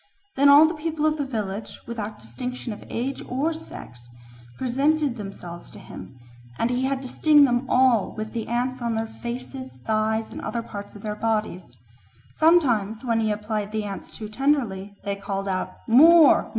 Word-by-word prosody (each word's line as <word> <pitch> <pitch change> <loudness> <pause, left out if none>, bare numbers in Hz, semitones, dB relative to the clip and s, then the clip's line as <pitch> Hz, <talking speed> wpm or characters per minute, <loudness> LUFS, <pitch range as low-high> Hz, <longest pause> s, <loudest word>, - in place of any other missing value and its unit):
Then 280 +1 +5
all 290 +2 +9
the 320 - 0
people 310 -1 -2
of 310 0 +2
the 285 - -1
village, 210 -4 -4
without 220 -2 -5
distinction 230 - -6
of - - -11
age 260 +4 -3
or 280 +6 0
sex, 120 - -11 0.5
presented 275 +2 +1
themselves 195 -5 -8
to - - -13
him, 130 - -11 0.4
and 235 - 0
he 250 +1 0
had 270 0 -1
to - - -5
sting 295 +2 +5
them 245 0 0
all 250 -5 +3
with 215 0 -5
the 230 -2 -3
ants 250 +2 -1
on 235 -1 -1
their 225 0 -1
faces, 250 +3 -7
thighs, 220 0 0
and - - -7
other 235 -1 -3
parts 205 -2 -8
of 205 - -11
their 210 -1 -3
bodies. 210 - -2 0.6
Sometimes, 250 - +3
when 230 -2 +1
he 220 -1 +1
applied 210 0 -3
the 215 0 -2
ants 200 -1 -7
too 215 - -7
tenderly, 215 -6 -1
they 200 0 -2
called 195 0 -4
out 185 -1 -3
"More! 315 +6 +7
230 Hz, 175 wpm, -24 LUFS, 210-270 Hz, 0.6 s, all